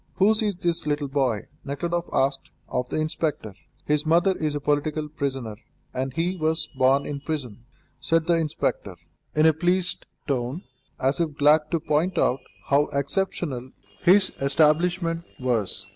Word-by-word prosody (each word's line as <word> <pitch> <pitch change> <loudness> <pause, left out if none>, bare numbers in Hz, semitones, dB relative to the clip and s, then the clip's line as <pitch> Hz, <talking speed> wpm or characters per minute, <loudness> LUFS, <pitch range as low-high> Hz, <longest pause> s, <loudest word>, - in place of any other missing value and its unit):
"Whose 215 +3 +4
is 210 -3 0
this 170 -2 -1
little 145 -1 0
boy?" 130 -6 0 0.2
Nekhludoff 170 +5 -2
asked 135 0 0 0.2
of 125 0 -2
the - - -1
inspector. 155 -8 -2 0.3
"His 150 0 +1
mother 170 +4 +3
is 155 -3 -2
a - - -1
political 150 +1 0
prisoner, 135 -8 -4 0.4
and 130 +1 -2
he 170 +6 -1
was 160 0 0
born 135 +2 +3
in 145 -1 -4
prison," 130 -7 -5 0.3
said 165 -1 +1
the 170 - +3
inspector, 165 -3 -1 0.4
in 155 +1 +4
a 160 - +6
pleased 180 +3 0 0.2
tone, 135 +4 -2 0.4
as 135 +4 +1
if 155 -4 -1
glad 150 +1 +4
to 165 - 0
point 155 +5 0
out 125 - +2 0.3
how 145 +1 +4
exceptional 140 -3 -2 0.3
his 185 +2 +5
establishment 165 +4 +2 0.2
was. 110 -6 -1
150 Hz, 150 wpm, -25 LUFS, 135-170 Hz, 0.4 s, a